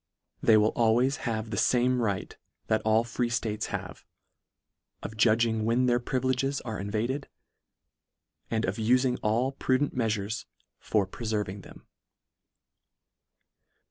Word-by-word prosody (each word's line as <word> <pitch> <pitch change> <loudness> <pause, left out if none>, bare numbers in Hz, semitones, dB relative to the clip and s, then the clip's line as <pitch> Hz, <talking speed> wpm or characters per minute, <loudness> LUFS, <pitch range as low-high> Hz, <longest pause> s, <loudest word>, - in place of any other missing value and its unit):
They 110 - +6
will 105 +1 +3
al 115 -1 +3
ways 130 +3 +2
have 110 -1 -3
the 105 - -3
fame 125 +3 +2
right 100 -4 -2 0.3
that 110 - +1
all 110 +1 +3
free 120 +1 -2
ftates 110 -2 -2
have, 95 -4 -6 1.0
of 110 - -6
judging 110 0 +3
when 115 +3 +2
their 120 -1 +3
privileges 130 +2 -1
are 110 -5 -5
invaded, 115 +8 -2 1.2
and 115 -1 0
of 95 +2 -2
ufing 125 +3 +2
all 115 +5 +1
prudent 135 +1 0
meafures 110 -3 -1 0.3
for 105 -3 +1
preferving 105 -1 -3
them. - - -15
115 Hz, 125 wpm, -28 LUFS, 110-125 Hz, 1.2 s, They